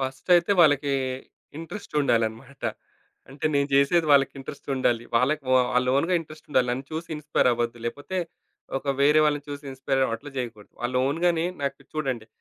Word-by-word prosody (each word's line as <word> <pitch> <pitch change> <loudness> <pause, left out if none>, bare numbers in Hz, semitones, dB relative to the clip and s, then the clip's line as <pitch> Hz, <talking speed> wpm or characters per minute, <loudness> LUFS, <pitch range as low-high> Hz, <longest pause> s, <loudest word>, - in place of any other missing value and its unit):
ఫస్టయితే 170 +8 +2
వాళ్ళకి 145 -3 +4 0.7
ఇంట్రెస్టుండాలన్నమాట. 135 - -2 0.7
అంటే 140 +3 -3
నేను 140 0 +2
చేసేది 155 +4 +4
వాళ్ళకి 140 0 +4
ఇంట్రెస్టుండాలి. 130 -3 -2
వాళ్ళకి 140 +5 +2
వా 130 - +6
వాళ్ళ 125 0 +3
ఓన్‌గా 170 +6 +1
ఇంట్రెస్టుండాలి. 155 -5 -1
నన్ను 130 +2 -3
చూసి 160 +1 -5
ఇన్‌‌‌స్పైర్ 150 -4 +1
అవ్వద్దు. 120 0 -2
లేపోతే 145 +9 -5 0.6
ఒక 140 0 -1
వేరే 150 +2 +5
వాళ్ళని 145 -1 +1
చూసి 145 0 -7
ఇన్‌‌‌స్పైర్ 135 0 0
అట్లా 140 +5 -9
చేయకూడదు. 115 -4 -6
వాళ్ళ 125 +1 -2
ఓన్‌గానే 165 +3 +1 0.2
నాకు 140 0 -3
చూడండి. 130 -7 -2
140 Hz, 140 wpm, -25 LUFS, 130-155 Hz, 0.7 s, వా